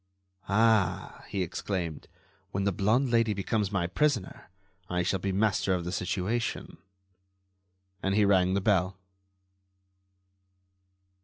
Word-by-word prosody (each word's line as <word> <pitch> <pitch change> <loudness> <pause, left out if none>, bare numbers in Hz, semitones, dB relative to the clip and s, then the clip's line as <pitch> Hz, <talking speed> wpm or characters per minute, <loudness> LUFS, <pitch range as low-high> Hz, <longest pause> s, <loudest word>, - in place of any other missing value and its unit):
"Ah!" 110 -2 +2
he 95 -2 -1
exclaimed, 85 -2 -4 0.4
"when 100 - -2
the 100 - +2
blonde 110 +8 +1
Lady 115 -3 +2
becomes 100 +1 -1
my 95 -4 0
prisoner, 110 -1 -1 0.4
I 90 0 0
shall 95 +2 0
be 95 +2 -2
master 100 -1 +1
of 85 -2 -4
the 90 - -3
situation." 95 +6 -2 1.2
And 95 +1 0
he 105 -1 +4
rang 95 -1 +3
the 100 - +1
bell. 95 -1 +1
100 Hz, 120 wpm, -28 LUFS, 90-110 Hz, 1.2 s, he